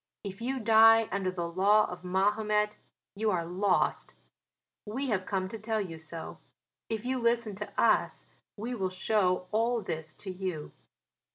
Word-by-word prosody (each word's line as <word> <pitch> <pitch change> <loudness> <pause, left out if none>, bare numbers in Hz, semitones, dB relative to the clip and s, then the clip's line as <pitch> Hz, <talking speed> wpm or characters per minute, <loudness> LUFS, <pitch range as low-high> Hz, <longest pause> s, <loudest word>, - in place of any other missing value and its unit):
If 195 0 -7
you 260 +3 -2
die 225 0 +6
under 195 -1 0
the 175 -2 -3
law 200 +5 +4
of 180 0 -8
Mahomet 210 +3 +1 0.4
you 215 +1 0
are 175 -4 0
lost. 185 +4 0 0.7
We 255 +6 -3
have 190 -4 -1
come 190 -1 -1
to 225 - -7
tell 220 +1 -1
you 170 -6 -5
so: 160 +1 -8 0.5
if 225 0 -3
you 260 0 0
listen 235 -2 +1
to 210 - -6
us - - +2 0.3
we 230 +4 -4
will 190 -6 -1
show 185 -1 +1
all 230 +1 +1
this 160 -2 -5
to 190 - -7
you." 180 -5 -5
205 Hz, 160 wpm, -30 LUFS, 185-225 Hz, 0.7 s, die